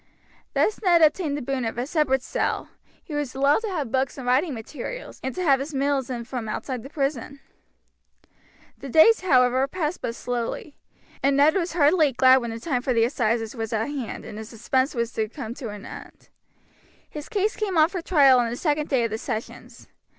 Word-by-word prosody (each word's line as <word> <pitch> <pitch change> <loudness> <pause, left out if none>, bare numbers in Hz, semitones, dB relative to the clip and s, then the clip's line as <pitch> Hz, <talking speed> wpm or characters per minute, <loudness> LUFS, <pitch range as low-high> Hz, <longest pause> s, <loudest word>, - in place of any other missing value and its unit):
Thus 430 - +1
Ned 345 -4 +4
obtained 305 -1 +2
the 290 - -5
boon 270 0 -2
of 225 0 -3
a 245 - -1
separate 270 -4 +1
cell, - - -2 0.3
he 310 - -9
was 295 -3 -3
allowed 280 +2 +3
to 445 - -4
have 300 - -3
books 265 +2 0
and 260 - -7
writing 265 +7 +2
materials, 270 - -7
and 265 - -4
to 365 - -2
have 275 -5 +4
his 285 +2 -5
meals 275 -1 0
in 240 -2 -4
from 235 -2 -5
outside 250 +3 -4
the 270 - -10
prison. 280 -2 -3 1.4
The 275 - -8
days, 380 - +6
however, 260 -5 +3
passed 325 +1 -3
but 230 - -3
slowly, 245 +5 -4 0.5
and 275 0 +2
Ned 295 +2 +5
was 345 -3 -1
heartily 305 -2 +4
glad 260 +2 +6
when 240 -3 -2
the 225 0 -5
time 250 -1 -1
for 255 0 0
the 225 - +4
assizes 230 -3 0
was 225 -1 -4
at 220 0 0
hand 275 -6 -5
and 210 - -8
his 220 0 -8
suspense 260 +5 -1
was 235 0 -2
to 215 -1 -2
come 235 -3 -6
to 245 -2 -7
an 205 -1 -9
end. - - -11 0.8
His 300 -1 -9
case 420 -1 0
came 395 -5 -2
on 315 +1 +5
for 365 -2 -4
trial 280 -7 +5
on 235 -1 +1
the 235 - -3
second 300 0 -1
day 260 -4 +2
of 230 - -1
the 220 - -3
sessions. 220 0 -7
270 Hz, 210 wpm, -24 LUFS, 240-305 Hz, 1.4 s, days